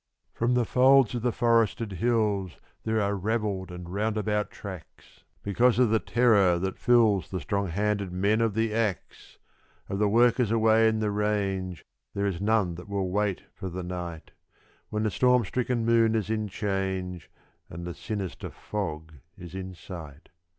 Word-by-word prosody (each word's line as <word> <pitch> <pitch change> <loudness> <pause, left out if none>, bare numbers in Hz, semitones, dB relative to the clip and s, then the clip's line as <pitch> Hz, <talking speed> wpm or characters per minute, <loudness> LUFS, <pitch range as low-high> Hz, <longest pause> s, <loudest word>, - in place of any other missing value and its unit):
From 120 +2 +1
the 120 -1 +2
folds 130 0 +5
of 120 - -2
the 125 +1 +1
forested 115 -1 +1
hills 105 -2 0 0.3
there 110 0 +1
are 100 -1 +1
ravelled 100 -2 -2
and 90 -1 -8
roundabout 105 +2 -1
tracks, 95 -5 -11 0.2
Because 115 +5 +2
of 125 -3 +3
the 110 - +3
terror 105 -8 +3
that 95 +2 -3
fills 115 -6 +3
the 95 - -3
strong 100 +1 -2
handed 100 +2 -1
men 100 +5 +1
of 115 -3 +1
the 110 -1 0
axe! 110 -5 -3 0.5
Of 100 - -3
the 105 -1 +3
workers 120 +1 +3
away 110 0 +4
in 110 0 +1
the 105 -1 0
range 100 -4 -2 0.3
there 100 0 0
is 95 -3 -2
none 105 -4 +2
that 90 +4 -10
will 95 -2 -2
wait 105 -1 0
for 95 - -6
the 90 +1 -5
night, 90 -2 -6 0.6
When 105 0 -2
the 110 - 0
storm 125 0 +3
stricken 125 0 -1
moon 115 -1 +3
is 110 -1 -1
in 110 -1 -1
change 95 -3 -3 0.4
and 85 +2 -7
the 85 - -5
sinister 95 +2 -5
fog 80 -6 -5 0.2
is 85 -1 -10
in 95 -1 -6
sight. 80 -3 -10
105 Hz, 165 wpm, -27 LUFS, 95-110 Hz, 0.6 s, folds